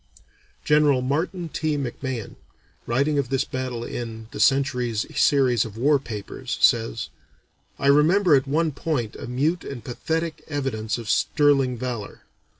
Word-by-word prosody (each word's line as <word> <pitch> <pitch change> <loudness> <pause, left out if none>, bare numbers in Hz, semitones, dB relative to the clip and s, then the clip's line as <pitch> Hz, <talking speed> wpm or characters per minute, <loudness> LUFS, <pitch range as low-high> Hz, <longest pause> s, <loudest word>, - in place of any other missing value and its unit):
General 150 -4 +4
Martin 165 +6 -1
T. 155 -1 -1
McMahon, 130 -3 -4 0.5
writing 140 +5 +1
of 130 -3 -2
this 135 0 +1
battle 130 -2 -4
in 115 -2 -6
"The - - -7
Century's" 125 -5 +2
series 130 -5 +3
of 110 -2 -9
war 140 +4 +3
papers, 105 -6 -6
says: - - +2 0.7
"I - - -4
remember 155 +6 +5
at 135 0 +1
one 160 +3 +1
point 140 -7 -2
a - - -7
mute 150 +8 0
and 130 -4 -7
pathetic 160 +5 -3
evidence 125 -8 -2
of 115 -2 -8
sterling 135 0 +2
valor. 120 -4 -5
135 Hz, 140 wpm, -24 LUFS, 120-150 Hz, 0.7 s, remember